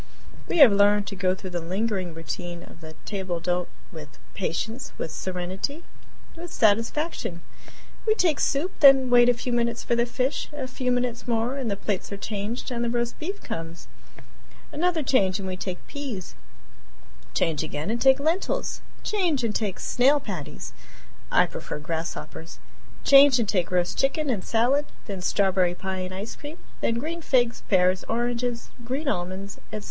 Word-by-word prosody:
We -, -, 0 dB
have 280 Hz, -8 st, +9 dB
learned 205 Hz, 0 st, +4 dB
to 200 Hz, -, -6 dB
go 185 Hz, -1 st, +1 dB
through 190 Hz, -1 st, -8 dB
the 175 Hz, -, -2 dB
lingering 185 Hz, 0 st, -2 dB
routine 175 Hz, +1 st, -5 dB
of 165 Hz, -, -14 dB
the 160 Hz, 0 st, -9 dB
table 185 Hz, -4 st, -3 dB
d'hote 180 Hz, +1 st, -1 dB, 0.2 s
with 150 Hz, -4 st, -11 dB, 0.2 s
patience, 220 Hz, +7 st, -3 dB
with 160 Hz, -, -4 dB
serenity, 185 Hz, -, -4 dB, 0.5 s
with 340 Hz, 0 st, -8 dB
satisfaction. 230 Hz, -, +1 dB, 0.7 s
We 435 Hz, -, +5 dB
take 335 Hz, -8 st, +2 dB
soup, 295 Hz, +7 st, +1 dB
then 270 Hz, -3 st, +7 dB
wait 245 Hz, 0 st, +7 dB
a 245 Hz, -, +4 dB
few 245 Hz, +1 st, -3 dB
minutes 235 Hz, 0 st, 0 dB
for 235 Hz, -, +1 dB
the 235 Hz, +1 st, +2 dB
fish; 255 Hz, +3 st, -1 dB
a 290 Hz, -3 st, -4 dB
few 255 Hz, 0 st, -2 dB
minutes 245 Hz, -1 st, -1 dB
more 235 Hz, +2 st, 0 dB
and 265 Hz, -4 st, -2 dB
the 200 Hz, -, 0 dB
plates 205 Hz, -1 st, -3 dB
are 200 Hz, -, -4 dB
changed, 210 Hz, +5 st, -4 dB
and 240 Hz, -1 st, -1 dB
the 235 Hz, -, 0 dB
roast 240 Hz, 0 st, -1 dB
beef 385 Hz, +6 st, -5 dB
comes; 165 Hz, +1 st, -6 dB, 0.8 s
another 330 Hz, 0 st, +1 dB
change 195 Hz, -9 st, +3 dB
and 195 Hz, -2 st, -5 dB
we 185 Hz, -, -3 dB
take 185 Hz, -1 st, -5 dB
peas; 260 Hz, -11 st, -6 dB, 1.0 s
change 160 Hz, -3 st, +1 dB
again 155 Hz, +4 st, -3 dB
and 235 Hz, 0 st, -2 dB
take 265 Hz, 0 st, +6 dB
lentils; 325 Hz, +6 st, -1 dB, 0.2 s
change 350 Hz, -, +1 dB
and 225 Hz, -2 st, 0 dB
take 205 Hz, -4 st, -2 dB
snail 275 Hz, +4 st, +3 dB
patties 185 Hz, -, -6 dB, 0.6 s
(I -, -, +5 dB
prefer -, -, -6 dB
grasshoppers); 165 Hz, +2 st, -5 dB, 0.5 s
change 275 Hz, -2 st, +8 dB
and 230 Hz, -3 st, 0 dB
take 180 Hz, -4 st, +1 dB
roast 180 Hz, 0 st, 0 dB
chicken 280 Hz, +1 st, +1 dB
and 205 Hz, -6 st, -2 dB
salad; 250 Hz, +6 st, +2 dB, 0.2 s
then 195 Hz, -3 st, -5 dB
strawberry 185 Hz, -2 st, +2 dB
pie 190 Hz, +1 st, -4 dB
and 185 Hz, 0 st, -4 dB
ice 200 Hz, +5 st, -5 dB
cream; 300 Hz, +3 st, -9 dB, 0.2 s
then 230 Hz, -, +1 dB
green 320 Hz, +8 st, -3 dB
figs, 245 Hz, -6 st, +2 dB
pears, 185 Hz, -1 st, +3 dB
oranges, 240 Hz, +1 st, -2 dB
green 265 Hz, +6 st, -3 dB
almonds, 190 Hz, -3 st, -3 dB
etc. 215 Hz, -, -3 dB
225 Hz, 170 wpm, -26 LUFS, 185-265 Hz, 1.0 s, have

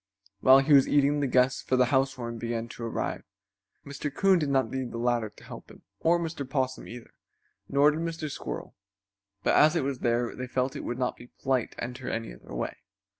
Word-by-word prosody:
While 130 Hz, +5 st, +7 dB
he 145 Hz, +2 st, +3 dB
was 135 Hz, -2 st, +7 dB
eating 145 Hz, 0 st, +3 dB
the 140 Hz, -, +1 dB
guests 125 Hz, 0 st, +2 dB
for 130 Hz, -, 0 dB
the 125 Hz, 0 st, +4 dB
housewarming 130 Hz, -3 st, 0 dB
began 115 Hz, 0 st, -3 dB
to 115 Hz, -, -8 dB
arrive. 115 Hz, -, -3 dB, 0.6 s
Mr. 140 Hz, +1 st, -5 dB
Coon 190 Hz, +4 st, +3 dB
did 150 Hz, -3 st, -1 dB
not 135 Hz, -1 st, +1 dB
need 130 Hz, -2 st, -3 dB
the -, -, -5 dB
ladder 120 Hz, -2 st, 0 dB
to -, -, -18 dB
help -, -, -10 dB
him, -, -, -16 dB, 0.2 s
or 170 Hz, +1 st, +3 dB
Mr. 165 Hz, -3 st, -4 dB
Possum, 130 Hz, -2 st, -2 dB
either, 120 Hz, 0 st, -10 dB, 0.6 s
nor 145 Hz, +2 st, +5 dB
did 155 Hz, -, -4 dB
Mr. 165 Hz, -1 st, -3 dB
Squirrel, 145 Hz, -, -6 dB, 0.7 s
but -, -, +3 dB
as 155 Hz, +3 st, +6 dB
it 165 Hz, -, +1 dB
was 135 Hz, -2 st, -2 dB
there 120 Hz, 0 st, 0 dB
they 125 Hz, -, -5 dB
felt 130 Hz, +2 st, -1 dB
it -, -, -5 dB
would 120 Hz, -, -3 dB
not 125 Hz, -1 st, -1 dB
be 120 Hz, -, -13 dB, 0.2 s
polite 130 Hz, -3 st, 0 dB
to -, -, -7 dB
enter 125 Hz, +1 st, -5 dB
any 115 Hz, -, -4 dB
other -, -, -11 dB
way. -, -, -3 dB
130 Hz, 215 wpm, -28 LUFS, 120-145 Hz, 0.7 s, While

